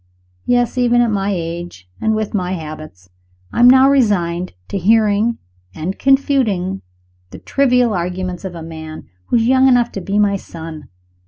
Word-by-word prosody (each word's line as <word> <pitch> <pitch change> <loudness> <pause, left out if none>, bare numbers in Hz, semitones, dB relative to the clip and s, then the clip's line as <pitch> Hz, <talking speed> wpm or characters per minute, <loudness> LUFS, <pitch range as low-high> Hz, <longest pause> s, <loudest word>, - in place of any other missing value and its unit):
Yes! 245 0 +1
even 240 -1 +3
at 235 -2 +1
my 200 -1 -1
age, 170 - -5
and 220 0 +1
with 215 -1 -3
my 185 -3 -1
habits, 155 - -9 0.4
I - - -2
am 245 +1 +8
now 265 +1 +6
resigned 185 -10 +1 0.2
to 200 - -2
hearing, 215 +3 +2 0.4
and 180 +5 -5
confuting, 255 -9 +1 0.5
the - - -10
trivial 250 -4 +1
arguments 180 0 -4
of 185 -2 -6
a 165 - -7
man 160 -1 -9 0.2
who - - 0
is 225 -1 +3
young 260 +1 +4
enough 245 -2 +3
to 195 - -6
be 195 +3 -2
my 205 -1 +2
son. 160 -6 -10
200 Hz, 165 wpm, -17 LUFS, 170-240 Hz, 0.5 s, am